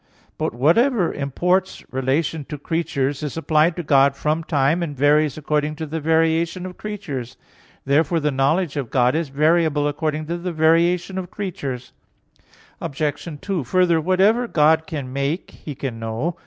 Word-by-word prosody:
But - - -2
whatever 185 - +3
imports 180 +7 -1
relation 140 +4 0
to 150 - -6
the 145 - -14
creature 160 -5 -1
is 145 +1 -5
applied 160 +1 +2
to 175 - -4
God 140 -1 +4
from 155 +3 -1
time, 150 +2 +1
and 150 -5 -4
varies 150 +1 +3
according 150 0 -1
to 160 +1 -5
the 160 +2 -4
variation 165 +3 +1
of 185 -1 -7
creatures. 140 - -6 0.5
Therefore 155 +4 +2
the 150 -1 0
knowledge 140 +4 +1
of 135 -5 -3
God 125 -1 +2
is 160 -2 -1
variable 155 +1 +2
according 155 +1 -2
to 170 +2 -3
the 180 +1 -3
variation 170 +4 +2
of 180 -2 -6
creatures. 140 -11 -5 0.9
Obj. 145 +2 -3
2: 190 -7 -2
Further, 170 +4 +2
whatever 195 +8 +3
God 160 -2 +3
can 140 -7 -5
make, 140 +6 -2
He 150 - -9
can 130 -4 -5
know. 115 +10 -3
155 Hz, 160 wpm, -21 LUFS, 140-170 Hz, 0.9 s, God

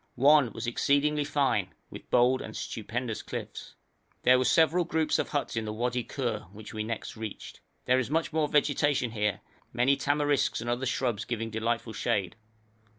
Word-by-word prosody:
One 140 -1 +5
was 115 - -5
exceedingly 145 +5 +2
fine, 135 -10 0 0.2
with - - -11
bold 125 +1 +4
and - - -7
stupendous 115 +1 -4
cliffs. - - -7 0.5
There 125 0 +6
were 130 - +1
several 165 +4 +4
groups 160 -1 0
of - - -1
huts 145 -5 -2
in 115 -1 -1
the 105 - -3
Wadi 120 +2 -1
Khur, 115 -9 -4
which 110 +3 -11
we 110 0 -3
next 115 +1 -5
reached. 110 -2 -7 0.3
There 130 +1 +3
is 125 - -2
much 165 +1 0
more 155 -1 +2
vegetation 145 -4 +2
here, 105 -2 -1 0.3
many 125 +3 +3
tamarisks 145 0 +1
and 120 +1 -2
other 125 +2 -1
shrubs 125 -4 -1
giving 115 -1 -4
delightful 115 +1 -2
shade. 100 -3 -1
125 Hz, 170 wpm, -29 LUFS, 110-145 Hz, 0.5 s, There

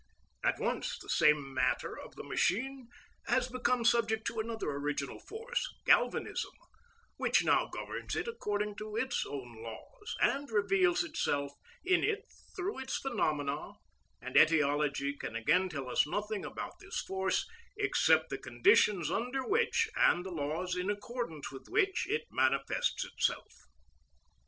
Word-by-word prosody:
At - - +2
once - - -1
the - - -13
same 145 -3 +3
matter 130 -1 0
of - - -10
the - - -7
machine 255 +6 0 0.4
has 255 +1 +2
become 250 -1 0
subject 225 -2 +3
to 225 - -2
another 225 -7 -2
original 145 -1 -3
force, 485 +3 -4
galvanism, - - +2 0.6
which - - +3
now - - +3
governs - - -5
it - - -2
according 210 - -2
to 215 0 -6
its 245 +2 0
own 120 -5 -7
laws, 115 - -8
and 280 +1 +2
reveals 360 - +3
itself 145 - -1 0.3
in 365 -1 +3
it 435 +1 0 0.3
through 380 -3 -3
its 265 0 -2
phenomena; 150 - -1 0.5
and - - -8
etiology 145 -2 +3
can 115 - -6
again 160 +11 +2
tell 140 -6 -5
us 125 - +2
nothing 210 +4 -2
about - - -6
this 400 -2 -4
force 190 0 0 0.3
except 160 - +3
the 135 - -3
conditions 150 - +3
under 250 +3 -1
which, 460 +3 +2
and 175 +1 +4
the 190 - -5
laws 165 +3 -2
in 180 +2 -2
accordance 205 - -4
with 135 - -10
which, 390 0 +1
it 450 +3 0
manifests - - +1
itself. - - -1
210 Hz, 140 wpm, -32 LUFS, -, 0.6 s, and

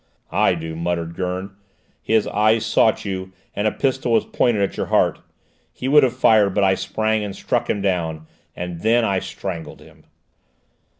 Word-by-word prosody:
"I 100 -1 +3
do," 80 -1 -6
muttered 85 0 -2
Gurn. 95 +2 -3 0.5
"His 110 -1 +2
eyes 110 +2 +2
sought 110 0 +2
you, 95 -1 -5 0.2
and 105 +2 0
a - - +2
pistol 130 -1 -1
was 115 - +3
pointed 110 -5 +1
at 100 - -2
your - - -3
heart! - - +2 0.5
He 130 - -5
would 150 +2 +6
have 130 -2 +1
fired, 105 -6 +4
but 100 - +2
I 95 -1 +4
sprang 110 +2 -1
and 100 -2 -5
struck - - -1
him 100 - -1
down! 80 -5 -1 0.3
And 90 -1 -5
then 115 +4 +3
I 95 -3 +1
strangled 85 -5 -6
him!" - - -18
100 Hz, 175 wpm, -21 LUFS, 90-110 Hz, 0.5 s, would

